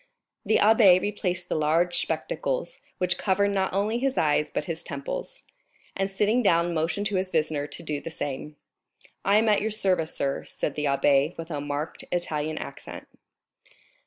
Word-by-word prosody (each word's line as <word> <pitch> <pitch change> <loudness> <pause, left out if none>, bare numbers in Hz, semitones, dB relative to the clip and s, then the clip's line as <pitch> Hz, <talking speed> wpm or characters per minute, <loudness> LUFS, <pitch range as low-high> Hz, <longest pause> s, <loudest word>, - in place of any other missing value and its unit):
The 220 - +2
abbé 210 -4 +6
replaced 185 -3 -2
the - - -2
large 165 +3 +2
spectacles, - - -3 0.2
which 180 -1 0
covered 200 +1 +2
not 190 -1 0
only 210 +5 0
his 270 +1 0
eyes 150 -1 +2
but 150 - -3
his 165 +1 -4
temples, 140 -4 -6 0.5
and 195 0 -1
sitting 210 +5 +2
down 170 -5 +3
motioned 170 +5 -1
to 200 -2 0
his 185 0 -1
visitor 155 -3 0
to 150 +3 -9
do 150 -3 -3
the - - -6
same. 150 -1 -5 0.7
"I 200 +2 +4
am 220 +1 +3
at 210 -1 +4
your 220 - 0
service, 185 -7 0
sir," 140 0 -1
said 145 - -3
the 150 - -2
abbé, 140 +2 +2
with 165 +1 -7
a 145 -2 -3
marked 145 +2 -4
Italian 155 -3 -1
accent. - - -8
175 Hz, 170 wpm, -26 LUFS, 150-200 Hz, 0.7 s, abbé